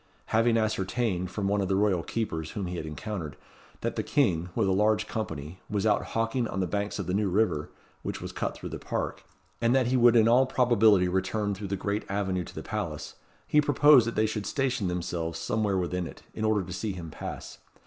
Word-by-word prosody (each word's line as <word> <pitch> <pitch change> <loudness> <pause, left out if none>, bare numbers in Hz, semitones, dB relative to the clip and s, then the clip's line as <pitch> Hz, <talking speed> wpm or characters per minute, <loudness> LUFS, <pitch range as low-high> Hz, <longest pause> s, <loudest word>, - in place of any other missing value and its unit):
Having 115 +1 +4
ascertained, 105 -3 0
from 100 +1 -2
one 100 0 +1
of 95 - -1
the 95 - +1
royal 100 -3 +2
keepers 80 -7 -3
whom 100 +2 -4
he 90 0 -4
had 80 - -5
encountered, 85 -1 -5 0.4
that - - -2
the - - +2
King, 90 - +1
with 110 -4 +2
a - - +2
large 105 +2 +2
company, 80 -5 -5
was 105 -1 -1
out 105 -1 +3
hawking 115 +2 0
on 95 - -4
the 95 - +1
banks 100 +3 -2
of - - -3
the 90 - -2
New 100 0 +1
River, 90 -6 +1 0.3
which - - -4
was - - -6
cut - - -3
through - - -7
the - - -6
park, - - -3 0.4
and 120 +2 +3
that 130 -2 +4
he 130 - +2
would 120 -1 +6
in 115 -1 +6
all 125 +3 +5
probability 110 -7 +4
return 95 +3 0
through 100 +1 -5
the 100 - -1
great 100 +2 -2
avenue 95 -2 -1
to - - -12
the - - -5
palace, - - -4 0.3
he 150 - +4
proposed 145 -3 +6
that 115 - -3
they 110 - +3
should 105 -1 -3
station 130 -8 0
themselves 85 -2 -3
somewhere 100 +4 0
within 90 -1 -1
it, - - -12
in 110 - -2
order 110 -2 +2
to 90 0 -7
see 105 +2 -3
him 85 -3 -7
pass. - - -7
100 Hz, 220 wpm, -28 LUFS, 90-110 Hz, 0.4 s, would